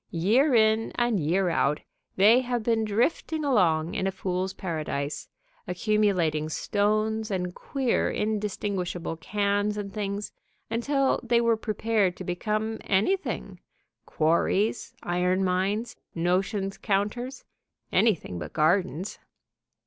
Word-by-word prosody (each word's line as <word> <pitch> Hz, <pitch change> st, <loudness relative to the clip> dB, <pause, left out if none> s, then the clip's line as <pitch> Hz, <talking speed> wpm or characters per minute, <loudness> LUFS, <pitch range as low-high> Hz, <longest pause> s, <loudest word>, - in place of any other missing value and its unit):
Year 235 Hz, -, +3 dB
in 220 Hz, 0 st, +3 dB
and 240 Hz, -4 st, +1 dB
year 175 Hz, +4 st, +1 dB
out 150 Hz, -2 st, +1 dB, 0.3 s
they 215 Hz, +6 st, +6 dB
have 245 Hz, -2 st, -2 dB
been 225 Hz, -1 st, +1 dB
drifting 290 Hz, +8 st, 0 dB
along 170 Hz, -, +2 dB
in 190 Hz, -, -1 dB
a -, -, 0 dB
fools' 185 Hz, 0 st, -2 dB
paradise, 155 Hz, -6 st, -4 dB, 0.4 s
accumulating 180 Hz, -6 st, +1 dB
stones 215 Hz, +5 st, 0 dB
and 180 Hz, -3 st, -2 dB
queer, 265 Hz, +2 st, 0 dB
indistinguishable 200 Hz, -5 st, -2 dB
cans 205 Hz, +3 st, 0 dB
and 200 Hz, -2 st, -5 dB
things, 205 Hz, 0 st, -3 dB, 0.4 s
until 270 Hz, +4 st, +1 dB
they 240 Hz, -1 st, +2 dB
were 230 Hz, -1 st, +3 dB
prepared 215 Hz, -3 st, 0 dB
to -, -, -6 dB
become 215 Hz, +5 st, -2 dB
anything, 360 Hz, -, 0 dB, 0.5 s
quarries, 190 Hz, +9 st, +1 dB
iron 180 Hz, +2 st, +1 dB
mines, 195 Hz, +5 st, 0 dB, 0.2 s
notion 190 Hz, +4 st, 0 dB
counters, 210 Hz, +7 st, -2 dB, 0.5 s
anything 175 Hz, -, +1 dB
but -, -, -7 dB
gardens. 180 Hz, +3 st, +1 dB
205 Hz, 110 wpm, -27 LUFS, 180-220 Hz, 0.5 s, they